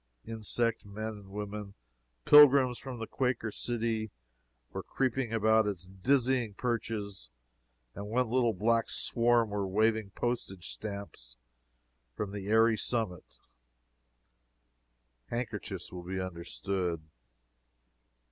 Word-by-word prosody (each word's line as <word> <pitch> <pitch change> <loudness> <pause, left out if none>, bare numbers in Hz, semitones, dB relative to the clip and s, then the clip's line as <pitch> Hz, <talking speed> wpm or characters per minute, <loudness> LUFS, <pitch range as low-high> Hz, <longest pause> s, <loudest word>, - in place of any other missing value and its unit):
Insect 115 +1 -1
men 105 +2 -5
and 100 -2 -12
women 105 0 -6 0.5
pilgrims 140 -4 +8
from 130 -2 -7
the 115 - -4
Quaker 125 -3 -1
City 115 -1 -2 0.6
were - - -4
creeping 130 -2 -1
about 110 -1 +4
its 95 -3 -3
dizzy 120 +4 +1
perches, 110 - -3 0.6
and 100 +1 -6
one 125 +3 +1
little 120 -1 +2
black 115 +4 +2
swarm 120 -2 +2
were 100 -1 -1
waving 110 +1 +2
postage 115 -7 -3
stamps 100 - -7 0.8
from 105 -2 -3
the 100 -1 -6
airy 110 +1 +4
summit 110 -8 -2 1.9
handkerchiefs 105 - -4
will 90 - -6
be 95 +2 -4
understood. 90 -1 -3
110 Hz, 105 wpm, -31 LUFS, 100-120 Hz, 1.9 s, pilgrims